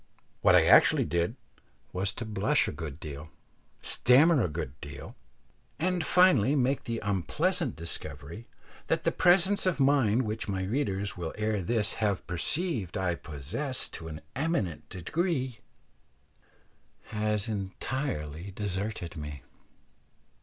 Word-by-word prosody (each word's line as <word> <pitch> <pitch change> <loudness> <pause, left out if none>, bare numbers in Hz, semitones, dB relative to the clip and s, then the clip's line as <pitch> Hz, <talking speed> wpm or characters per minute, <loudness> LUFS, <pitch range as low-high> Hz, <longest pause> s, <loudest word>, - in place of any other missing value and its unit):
What - - +6
I - - +6
actually - - +6
did 85 +2 0 0.6
was 95 +2 0
to 115 - -5
blush 110 +8 +2
a - - -2
good 75 -3 -7
deal, 75 0 -8 0.5
stammer 140 +3 +5
a - - +1
good 75 -4 -4
deal, 70 -2 -8 0.6
and 180 +1 0
finally 150 - +4
make 135 0 +1
the 115 -1 -2
unpleasant 100 -4 0
discovery 80 - -5 0.4
that - - 0
that - - 0
presence 185 +2 +4
of 180 -4 +1
mind 130 -4 +3
which 110 0 -3
my 95 -1 -1
readers 100 -3 -1
will 85 -2 -5
ere 105 -1 0
this 110 +2 +1
have 100 -3 0
perceived 105 - -1
I 90 -2 0
possess 85 - -3
to 80 - -7
an 80 -1 -7
eminent 135 - -1
degree, 130 - -2 1.5
had 105 0 0
entirely 95 - -3
deserted 100 -2 -4
me. 75 -2 -7
105 Hz, 125 wpm, -29 LUFS, 85-135 Hz, 1.5 s, What